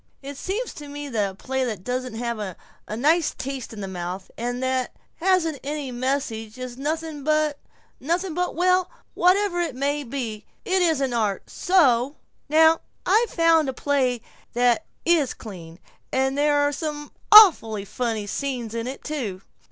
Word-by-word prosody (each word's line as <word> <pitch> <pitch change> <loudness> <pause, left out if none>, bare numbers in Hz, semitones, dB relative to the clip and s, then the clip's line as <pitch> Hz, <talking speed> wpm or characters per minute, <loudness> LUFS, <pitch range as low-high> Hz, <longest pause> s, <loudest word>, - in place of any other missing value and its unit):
It 280 +1 -7
seems 410 - -3
to 295 - -9
me 290 0 -6
that 210 -5 0
a 190 - -11
play 265 +5 -2
that 215 -7 -4
doesn't 250 -1 -3
leave 235 -2 -2 0.5
a 215 - -4
nice 315 +6 +2
taste 265 -2 -5
in 215 -2 -8
the 195 - -4
mouth 185 +1 -6
and 245 +2 -3
that 260 -1 -1 0.2
hasn't 335 -5 +1
any 290 -2 -4
message 240 -3 -2
is 255 -1 -6
nothing 305 +2 -3
but 305 -1 +1 0.4
nothing 345 +4 -1
but 360 +2 -1
Well, 365 +1 +2 0.2
whatever 365 0 +3
it 330 -7 -2
may 285 +2 -1
be, 230 -5 -5 0.2
it 375 0 +2
isn't 280 -7 +1
art. 210 -5 -1
So 280 -7 +3 0.3
Now 320 +1 +5 0.2
I've 455 +1 +3
found 330 -4 +3
a - - -3
play 255 -4 0 0.3
that 245 +4 +2 0.2
is 325 -6 +3
clean, 170 -6 -10 0.3
and 265 +1 +1
there's 290 0 +2
some 295 -1 -5 0.2
awfully 265 - +8
funny 220 0 -2
scenes 245 0 -3
in 230 +1 -3
it, 265 +1 -7
too. 225 -11 -4
275 Hz, 160 wpm, -24 LUFS, 235-315 Hz, 0.5 s, awfully